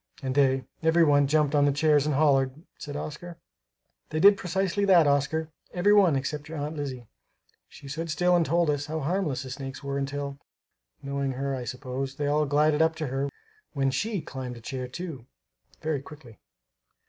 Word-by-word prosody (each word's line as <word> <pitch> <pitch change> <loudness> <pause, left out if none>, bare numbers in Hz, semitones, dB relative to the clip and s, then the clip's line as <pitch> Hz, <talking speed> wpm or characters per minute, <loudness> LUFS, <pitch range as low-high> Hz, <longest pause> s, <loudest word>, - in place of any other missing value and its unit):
"And 130 -1 -1
they, 135 -1 +3 0.2
every 165 +1 +4
one, 145 -2 +4
jumped 150 0 +2
on 145 -1 +4
the 145 - +3
chairs 150 0 +3
and 150 - +1
hollered," 135 0 +2 0.2
said 145 -1 -7
Oscar. 155 +3 -6 0.7
"They 155 - -2
did 200 +4 +8
precisely 190 +2 -1
that, 180 -5 +6
Oscar; 145 +3 +1 0.2
every 195 +4 +4
one 190 -7 +5
except 145 +3 -3
your 160 - -6
Aunt 150 +2 -4
Lizzie. 135 -5 -5 0.6
She 140 - -13
stood 165 +4 -4
still 180 +3 +2
and 175 - +4
told 170 0 +2
us 145 0 -2
how 155 +1 -3
harmless 150 -4 -1
the 130 - -8
snakes 135 0 -7
were 140 0 -2
until, 140 0 -4 0.6
knowing 140 -1 -2
her 135 +1 -2
I 125 -2 -5
suppose, 130 +1 -4
they 145 0 -2
all 150 +1 +2
glided 150 +2 +3
up 160 0 +3
to 155 -2 -3
her 135 +2 -1 0.4
when 135 -2 +1
she 210 +5 -1
climbed 130 -4 -7
a - - -12
chair, 130 +2 -5
too, 135 -3 -7 0.6
very 155 -3 -1
quickly. 140 -7 -14
145 Hz, 185 wpm, -27 LUFS, 135-160 Hz, 0.7 s, did